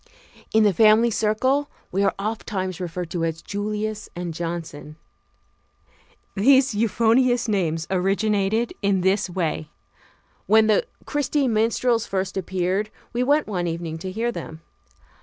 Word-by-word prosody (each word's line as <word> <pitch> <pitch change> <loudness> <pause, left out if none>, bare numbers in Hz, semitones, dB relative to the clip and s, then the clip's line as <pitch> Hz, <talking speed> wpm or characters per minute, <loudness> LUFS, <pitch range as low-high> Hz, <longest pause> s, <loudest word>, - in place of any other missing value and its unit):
In 220 0 +4
the 205 -2 +4
family 220 +4 +5
circle 260 +7 +1 0.2
we 195 - 0
are 200 - +2
ofttimes 195 -3 -3
referred 175 -1 -5
to 170 -2 -2
as 165 0 -3
"Julius" 210 +1 -3
and 175 -1 -4
"Johnson." 165 -3 -6 1.4
These 260 +4 +4
euphonious 230 +3 +2
names 170 -6 0
originated 200 +4 +1
in 195 -2 +2
this 190 +1 +1
way: 165 -4 -2 0.8
When 220 +2 +5
the 220 - +2 0.2
Christy 290 -1 0
Minstrels 230 +1 +1
first 190 0 -2
appeared, 190 +2 -1 0.2
we 240 - 0
went 290 +4 +3
one 180 -4 -2
evening 165 -1 -4
to 185 +3 -5
hear 230 +4 -1
them. 160 -8 -8
205 Hz, 130 wpm, -23 LUFS, 180-225 Hz, 1.4 s, family